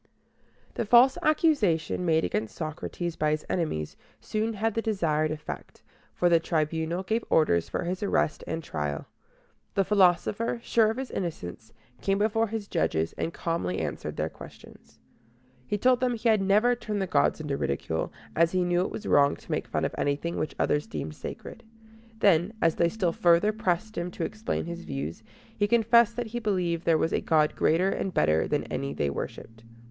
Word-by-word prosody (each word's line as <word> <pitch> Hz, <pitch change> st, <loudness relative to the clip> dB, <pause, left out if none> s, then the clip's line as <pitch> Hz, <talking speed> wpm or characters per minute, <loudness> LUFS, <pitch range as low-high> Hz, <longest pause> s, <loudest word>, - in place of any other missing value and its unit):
The -, -, -2 dB
false 245 Hz, +4 st, +7 dB
accusation 215 Hz, -, +2 dB
made 160 Hz, -1 st, +3 dB
against 110 Hz, 0 st, -3 dB
Socrates 165 Hz, +2 st, -4 dB
by 155 Hz, -, +1 dB
his 155 Hz, 0 st, -1 dB
enemies 155 Hz, -, -2 dB, 0.2 s
soon 215 Hz, -, -2 dB
had 220 Hz, +1 st, -1 dB
the 225 Hz, -, -1 dB
desired 165 Hz, -9 st, 0 dB
effect, 150 Hz, -1 st, -7 dB, 0.3 s
for 175 Hz, -, +2 dB
the 170 Hz, -1 st, +5 dB
Tribunal 160 Hz, +2 st, -1 dB
gave 220 Hz, +4 st, -1 dB
orders 85 Hz, -, +3 dB
for -, -, -2 dB
his 180 Hz, +2 st, -3 dB
arrest 200 Hz, -6 st, 0 dB
and 165 Hz, 0 st, -3 dB
trial. 75 Hz, -, -3 dB, 0.7 s
The 195 Hz, -, +3 dB
philosopher, 200 Hz, +4 st, +2 dB
sure 225 Hz, -2 st, +3 dB
of 225 Hz, -, -3 dB
his 265 Hz, -1 st, -5 dB
innocence, 115 Hz, -, -5 dB, 0.3 s
came 195 Hz, 0 st, +1 dB
before 225 Hz, +2 st, +1 dB
his 215 Hz, -1 st, -5 dB
judges, 80 Hz, -, 0 dB
and 165 Hz, -, -3 dB
calmly 165 Hz, -, -2 dB
answered -, -, -4 dB
their -, -, 0 dB
questions. -, -, -14 dB, 0.7 s
He 205 Hz, -, 0 dB
told 250 Hz, +3 st, +3 dB
them 250 Hz, -1 st, +1 dB
he 230 Hz, +1 st, 0 dB
had 215 Hz, -2 st, +4 dB
never 210 Hz, +5 st, +4 dB
turned 215 Hz, -3 st, -3 dB
the 190 Hz, -, 0 dB
gods 150 Hz, -4 st, +2 dB
into 150 Hz, -3 st, -2 dB
ridicule, 80 Hz, -, -2 dB, 0.2 s
as 165 Hz, +1 st, +3 dB
he 185 Hz, -1 st, +2 dB
knew 175 Hz, 0 st, +2 dB
it 185 Hz, -, -1 dB
was 215 Hz, -, -7 dB
wrong 140 Hz, 0 st, +4 dB
to -, -, -12 dB
make -, -, -1 dB
fun -, -, -1 dB
of -, -, -3 dB
anything 145 Hz, +4 st, -1 dB
which 155 Hz, -, -3 dB
others 150 Hz, +1 st, +1 dB
deemed 75 Hz, 0 st, -5 dB
sacred. -, -, -8 dB, 0.5 s
Then, 195 Hz, -1 st, +3 dB
as 165 Hz, -4 st, +3 dB
they 170 Hz, -, +2 dB
still 180 Hz, -4 st, -1 dB
further 175 Hz, +6 st, +4 dB
pressed 215 Hz, -1 st, -1 dB
him 175 Hz, +1 st, -3 dB
to 175 Hz, -, -5 dB
explain 215 Hz, -5 st, -3 dB
his 170 Hz, +1 st, -6 dB
views, 75 Hz, +4 st, -5 dB, 0.3 s
he 205 Hz, -, +1 dB
confessed 235 Hz, 0 st, +4 dB
that 245 Hz, -, -2 dB
he 240 Hz, -, -1 dB
believed 180 Hz, -6 st, -1 dB
there 165 Hz, -1 st, +4 dB
was 160 Hz, -, 0 dB
a -, -, +1 dB
God 155 Hz, -1 st, +2 dB
greater 175 Hz, +4 st, +2 dB
and 190 Hz, -, -2 dB
better 80 Hz, -, +2 dB
than -, -, 0 dB
any 70 Hz, +1 st, -4 dB
they 70 Hz, -1 st, 0 dB
worshiped. 115 Hz, +9 st, -7 dB
175 Hz, 185 wpm, -27 LUFS, 155-215 Hz, 0.7 s, false